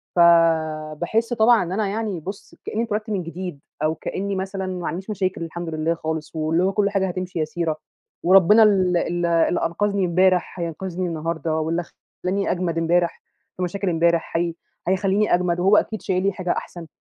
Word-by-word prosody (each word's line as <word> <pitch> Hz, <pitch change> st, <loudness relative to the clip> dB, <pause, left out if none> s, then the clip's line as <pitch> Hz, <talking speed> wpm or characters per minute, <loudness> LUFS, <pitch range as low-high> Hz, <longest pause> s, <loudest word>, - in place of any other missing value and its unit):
فباحس 165 Hz, +4 st, +3 dB
طبعًا 230 Hz, -2 st, +5 dB
إن 175 Hz, -, -5 dB
أنا 205 Hz, +2 st, 0 dB
يعني 205 Hz, -2 st, -2 dB
بُص 195 Hz, +5 st, -8 dB
كأنّي 225 Hz, -, -1 dB
اتولدت 215 Hz, -1 st, -3 dB
من 195 Hz, -4 st, -1 dB
جديد، 175 Hz, -2 st, -6 dB, 0.2 s
أو 155 Hz, +1 st, +1 dB
كأنّي 200 Hz, +4 st, -3 dB
مثلًا 190 Hz, 0 st, -3 dB
ما 185 Hz, -1 st, -4 dB
معنديش 180 Hz, +3 st, -4 dB
مشاكل 185 Hz, -4 st, -2 dB
الحمد 170 Hz, +1 st, -5 dB
لله 160 Hz, +1 st, 0 dB
خالص، 160 Hz, -1 st, -5 dB
واللي 160 Hz, +2 st, +1 dB
هو 190 Hz, -, +2 dB
كل 205 Hz, -1 st, +2 dB
حاجة 195 Hz, -1 st, 0 dB
هتمشي 185 Hz, -1 st, -4 dB
يسيرة، 160 Hz, 0 st, -1 dB, 0.5 s
وربنا 195 Hz, +4 st, +7 dB
ال 190 Hz, -4 st, +3 dB
ال 175 Hz, 0 st, -1 dB
اللي 170 Hz, +1 st, +2 dB
أنقذني 200 Hz, +3 st, 0 dB
امبارح 180 Hz, +1 st, +2 dB
هينقذني 175 Hz, +2 st, -3 dB
النهارده، 160 Hz, -1 st, -2 dB
واللي 165 Hz, +2 st, -1 dB, 0.4 s
خلّاني 195 Hz, +2 st, 0 dB
أجمد 175 Hz, -2 st, -1 dB
امبارح 170 Hz, +1 st, +1 dB, 0.4 s
في 180 Hz, -, -2 dB
مشاكل 195 Hz, +2 st, -2 dB
امبارح 170 Hz, 0 st, +1 dB
هي 170 Hz, 0 st, 0 dB, 0.3 s
هيخلّيني 195 Hz, +3 st, +2 dB
أجمد، 175 Hz, -1 st, +1 dB
وهو 195 Hz, +4 st, +5 dB
أكيد 220 Hz, -, 0 dB
شايل 185 Hz, 0 st, 0 dB
لي 195 Hz, -, +2 dB
حاجة 180 Hz, -2 st, -2 dB
أحسن. 170 Hz, -2 st, -5 dB
180 Hz, 175 wpm, -22 LUFS, 165-195 Hz, 0.5 s, وربنا